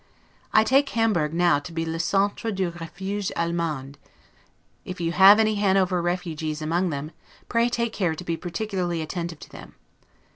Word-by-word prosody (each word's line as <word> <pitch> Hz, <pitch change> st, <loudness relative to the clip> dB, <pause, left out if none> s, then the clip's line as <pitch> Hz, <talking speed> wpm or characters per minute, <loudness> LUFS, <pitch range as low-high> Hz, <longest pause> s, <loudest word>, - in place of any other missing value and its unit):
I 215 Hz, -, +5 dB
take 275 Hz, +4 st, +3 dB
Hamburg 210 Hz, -, +1 dB
now 175 Hz, -2 st, +3 dB
to 155 Hz, +4 st, -10 dB
be 165 Hz, 0 st, -3 dB
'le 165 Hz, 0 st, -3 dB
centre 200 Hz, +5 st, 0 dB
du 190 Hz, -3 st, -1 dB
refuge 190 Hz, +4 st, -5 dB
Allemand'. 160 Hz, -5 st, -2 dB, 0.8 s
If 185 Hz, 0 st, -7 dB
you 165 Hz, -1 st, -1 dB
have 195 Hz, +4 st, +8 dB
any 215 Hz, -1 st, +3 dB
Hanover 190 Hz, -3 st, +2 dB
'refugies' 165 Hz, -3 st, -3 dB
among 170 Hz, +4 st, 0 dB
them, 150 Hz, 0 st, -5 dB, 0.4 s
pray 235 Hz, 0 st, +2 dB
take 235 Hz, -1 st, -1 dB
care 175 Hz, -5 st, 0 dB
to 180 Hz, -, -8 dB
be 170 Hz, -1 st, -2 dB
particularly 175 Hz, -2 st, -3 dB
attentive 170 Hz, +1 st, -5 dB
to -, -, -11 dB
them. -, -, -12 dB
175 Hz, 160 wpm, -24 LUFS, 165-200 Hz, 0.8 s, have